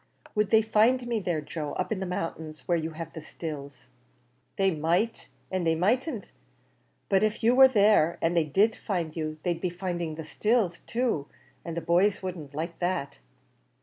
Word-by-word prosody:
"Would 210 -1 +1
they 220 +1 +5
find 225 +4 +3
me 235 -2 0
there, 175 -5 -1
Joe, 150 0 -5
up - - -3
in 215 - -1
the 190 - -3
mountains, 160 -3 -5
where 175 - +3
you 160 -1 -1
have 165 - -6
the 160 - -7
stills?" 140 -6 -8 0.7
"They 195 -1 +2
might, 170 +8 0 0.2
and 185 -1 0
they 165 -1 +2
mightn't; 230 - 0 0.8
but 195 -1 +3
if 215 +1 0
you 235 +2 +5
war 265 +1 +9
there, 205 -8 +4
an' 165 +1 +1
they 170 -2 +3
did 200 +10 +3
find 170 -7 -3
you, 155 -1 -3
they'd 170 -2 -1
be 180 - 0
finding 175 -3 -3
the 160 0 -7
stills 210 -2 +1
too, 230 - -1 0.4
an' 170 -2 -5
the 170 - -2
boys 185 +5 +2
wouldn't 160 -7 -6
like 165 +2 -4
that." 175 - -2
175 Hz, 180 wpm, -28 LUFS, 160-210 Hz, 0.8 s, war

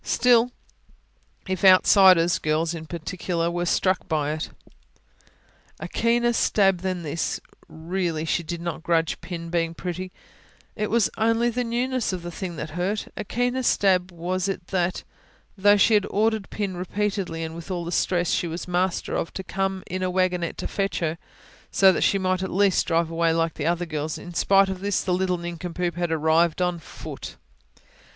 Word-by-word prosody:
Still, 245 0 +3 1.0
if 185 0 -3
outsiders, 185 -2 +6
girls 155 +2 0
in 160 -1 -7
particular, 170 +1 -2
were 175 0 -2
struck 185 +2 +1
by 150 -3 0
it... 155 +1 -4 1.3
A - - -5
keener 240 +1 +1
stab 195 -5 +3
than 185 -1 -3
this 160 +2 -2 0.3
really, 165 -1 -3
she 170 - 0
did 170 +1 -5
not 170 -1 -4
grudge 165 -1 0
Pin 170 -1 -6
being 165 -1 0
pretty: 185 +1 -5 0.6
it 210 -1 -2
was 230 -2 +2
only 230 +2 +2
the 250 +2 -1
newness 245 +1 -1
of 180 -2 -5
the 175 - -5
thing 175 -1 -5
that 155 0 -6
hurt 185 +5 -2
a - - -4
keener 245 +4 -1
stab 190 -6 +2
was 180 +2 -2
it 195 -3 -4
that, 180 -1 -1 0.5
though 205 +1 +5
she 220 +3 +4
had 210 -2 +3
ordered 215 0 0
Pin 200 -3 -3
repeatedly, 185 -2 -2
and 160 0 -5
with 170 +2 -9
all 175 -2 -3
the 170 - -4
stress 175 -1 +1
she 175 - 0
was 165 +2 -5
master 180 0 -1
of, - - -2
to 190 - -5
come 190 0 -2
in 185 +1 -4
a 185 - 0
wagonette 180 -2 0
to - - -3
fetch 195 -1 -2
her, 165 -1 -2 0.5
so 195 -1 +5
that - - -1
she 200 - +3
might 185 -1 0
at 190 - -2
least 195 0 +2
drive 165 -1 +1
away 165 0 +2
like 165 -1 0
the 150 0 -3
other 175 +1 0
girls; 155 -1 -3
in 175 - -9
spite 195 +3 +4
of 190 -1 -4
this, 200 0 -1
the 185 - 0
little 180 0 +1
nincompoop 175 0 -4
had 175 0 -1
after 160 - +1
all 155 - -7
arrived 170 0 +3
on 180 -1 0
foot. - - -9
180 Hz, 185 wpm, -24 LUFS, 170-195 Hz, 1.3 s, outsiders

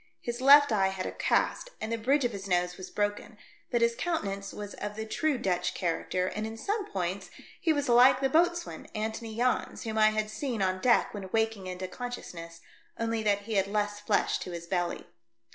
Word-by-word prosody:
His 240 +1 -4
left 285 +1 +8
eye 195 -3 +3
had 190 -1 -3
a - - -3
cast - - 0
and 220 - -4
the - - +1
bridge 270 +4 +2
of 240 - +1
his 200 -2 -7
nose 180 -1 +1
was 185 0 -8
broken, 205 +1 -2 0.3
but 240 - +1
his 235 0 +3
countenance 200 - -3
was 205 -1 -7
of 210 0 -5
the 220 0 -4
true 290 +6 0
Dutch 180 -5 -1
character, 180 +1 -1
and 215 +3 -3
in 225 0 -7
some 410 - -2
points 185 0 -3 0.3
he 340 -3 +2
was 290 -2 0
like 250 +2 +6
the 270 - +2
boatswain, 345 +4 +1
Antony 220 +1 -4
Jans, 250 +1 0
whom 220 -1 -2
I 215 0 +7
had 215 0 -2
seen 250 -4 -3
on 185 -1 0
deck 245 -2 +3
when 195 -3 -6
waking 220 -4 0
into 185 0 -4
consciousness, 170 -8 -7 0.4
only 230 -1 -1
that 205 -2 +2
he 220 +2 -6
had 195 0 +2
less 205 0 -1
flesh 210 0 +1
to - - -6
his 170 -1 -6
belly. 175 0 -2
215 Hz, 205 wpm, -29 LUFS, 190-240 Hz, 0.4 s, left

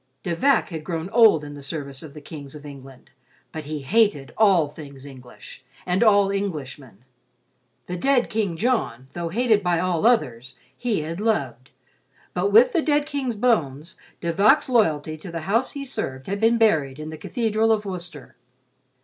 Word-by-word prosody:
De 170 - -2
Vac 275 +9 +2
had 160 -3 -6
grown 165 +3 -4
old 220 -10 +5
in 145 0 -8
the 145 - -10
service 140 -1 -6
of 155 -3 -12
the 150 - -9
kings 145 -2 -10
of 150 0 -11
England, 135 -2 -12 0.4
but 155 -1 -7
he 150 -1 -5
hated 185 - +1
all 195 -8 +4
things 140 -2 -12
English 130 -3 -13 0.2
and 180 +4 +1
all 200 -3 +4
Englishmen. 145 - -5 0.8
The 180 - -5
dead 260 +5 +2
King 205 -6 -2
John, 160 - -1
though 170 -1 -4
hated 220 +2 +2
by 175 -2 +1
all 180 +3 +1
others, 125 - 0 0.2
he 230 -9 -1
had 165 +5 -5
loved, 220 0 -1 0.6
but 410 - 0
with 485 +2 +6
the 340 - +2
dead 295 -1 +1
King's 280 -5 -3
bones 170 - 0 0.3
De 170 -1 -1
Vac's 215 - +4
loyalty 160 - +1
to 175 +3 -9
the 165 -1 -5
house 225 +10 0
he 280 -1 -6
served 130 - -5
had 200 +1 -3
been 225 +2 +3
buried 155 -12 +2
in 155 +1 -7
the - - -6
Cathedral 225 - 0
of 215 -1 +1
Worcester. 175 -6 -8
175 Hz, 175 wpm, -23 LUFS, 145-225 Hz, 0.8 s, with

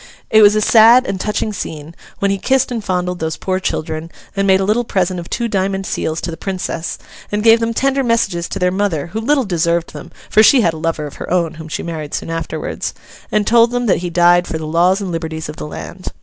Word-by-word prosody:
It 220 - +6
was 210 0 +7
a 215 - +2
sad 230 +4 +6
and 190 -5 -3
touching 210 0 -2
scene, 155 -4 -6 0.2
when 200 0 +1
he 195 - -1
kissed 265 +4 +1
and 230 -3 -3
fondled 180 -2 -2
those 160 0 -3
poor 185 0 -2
children, 160 -2 -3 0.3
and 195 0 0
made 190 0 +5
a - - 0
little 215 +5 +1
present 185 -4 -1
of 170 - -9
two 235 -1 -1
diamond 195 -2 -1
seals 160 -2 -2
to 170 - -4
the 165 - -7
Princess, 185 -3 -4 0.3
and 210 0 -1
gave 225 0 +6
them 230 0 -1
tender 275 +3 +1
messages 230 -8 0
to - - -4
their 180 0 +1
mother 180 -5 -1
(who 220 - -2
little 275 +2 +2
deserved 170 -2 0
them, - - -10 0.2
for 215 - +4
she 245 +4 +6
had 170 -6 +2
a - - -7
lover 160 -1 -2
of 145 - -9
her - - -7
own 170 -2 0
whom 160 0 -9
she 155 - -4
married 155 -3 -5
soon - - -4
afterwards), 165 - -4 0.4
and 210 -1 +1
told 230 +1 +5
them 245 0 -1
that 205 - +3
he 175 0 -4
died 175 +1 +4
'for 160 - -3
the 160 - -6
laws 175 +5 +2
and 190 -3 -4
liberties 160 -2 -4
of 150 - -8
the - - -6
land. 185 +4 -9
185 Hz, 245 wpm, -17 LUFS, 165-220 Hz, 0.4 s, was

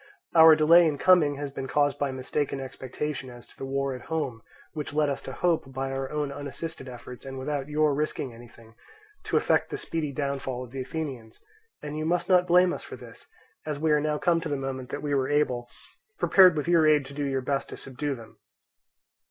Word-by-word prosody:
Our 160 -1 +9
delay 165 +2 +6
in 150 -2 -1
coming 160 -4 +4
has 140 0 -5
been 135 -1 -5
caused 145 0 +1
by 140 - 0
mistaken 135 +2 -2
expectations 135 +1 -5
as 120 -1 -12
to - - -21
the 135 - -6
war 135 0 -1
at 125 - -9
home, 140 -8 -3 0.3
which 150 -2 -5
led 150 -1 +2
us 140 - -4
to - - -7
hope, 160 -1 0
by 135 0 -3
our 135 0 -3
own 150 -2 -2
unassisted 145 0 -6
efforts 125 0 -10
and 135 0 -7
without 140 +1 -3
your 150 0 +2
risking 140 -3 -2
anything, 115 -1 -15 0.5
to - - +1
effect - - +2
the - - -4
speedy 160 -3 -3
downfall 135 -3 -3
of 125 - -12
the 135 0 -4
Athenians; 130 -5 -6 0.4
and 150 +1 -5
you 155 - -2
must 175 +1 0
not 180 -1 +5
blame 180 +1 +5
us - - -6
for - - -8
this, 120 -2 -14 0.4
as 150 -2 -3
we 155 +1 +1
are 150 -1 +4
now 150 0 0
come 170 +1 +2
the 155 -3 -3
moment 135 -2 -5
that 145 - -5
we 145 -1 -1
were 135 -2 +1
able, 125 -5 0 0.5
prepared 180 0 +6
with 150 - -2
your 165 -2 +4
aid 150 -2 +4
to 135 - -10
do 140 -1 -2
our - - +1
best 135 +1 -2
to - - -8
subdue 140 +2 -4
them. 115 -2 -14
145 Hz, 215 wpm, -27 LUFS, 130-155 Hz, 0.5 s, Our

